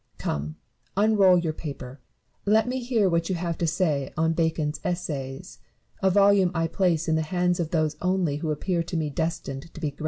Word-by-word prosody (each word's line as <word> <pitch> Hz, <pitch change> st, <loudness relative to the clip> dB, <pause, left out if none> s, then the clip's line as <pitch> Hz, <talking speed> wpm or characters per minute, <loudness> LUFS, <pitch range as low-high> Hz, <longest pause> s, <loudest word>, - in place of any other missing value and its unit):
Come, 75 Hz, +1 st, -3 dB, 0.4 s
unroll 200 Hz, -3 st, +5 dB
your 165 Hz, -2 st, -1 dB
paper; 140 Hz, -4 st, -7 dB, 0.4 s
let 220 Hz, +3 st, +3 dB
me 255 Hz, +1 st, -1 dB
hear 235 Hz, -5 st, +1 dB
what 170 Hz, -1 st, 0 dB
you 185 Hz, -, 0 dB
have 170 Hz, -1 st, -2 dB
to 170 Hz, -, +1 dB
say 155 Hz, -5 st, 0 dB
on 160 Hz, +1 st, +2 dB
Bacon's 160 Hz, -2 st, 0 dB
Essays, 140 Hz, -7 st, -4 dB, 0.2 s
— -, -, -36 dB
a 190 Hz, -, +4 dB
volume 200 Hz, -1 st, +5 dB
I 165 Hz, 0 st, +1 dB
place 170 Hz, -2 st, +1 dB
in 160 Hz, -, +2 dB
the 160 Hz, -, +2 dB
hand 180 Hz, +2 st, 0 dB
of 165 Hz, -3 st, -1 dB
those 155 Hz, -2 st, 0 dB
only 180 Hz, -5 st, +1 dB
who 155 Hz, +1 st, -3 dB
appear 170 Hz, +3 st, 0 dB
to 170 Hz, +1 st, -3 dB
me 155 Hz, -2 st, -1 dB
destined 160 Hz, -1 st, -3 dB
to -, -, -10 dB
be 155 Hz, -3 st, -2 dB
great. -, -, -27 dB
165 Hz, 205 wpm, -26 LUFS, 155-185 Hz, 0.4 s, unroll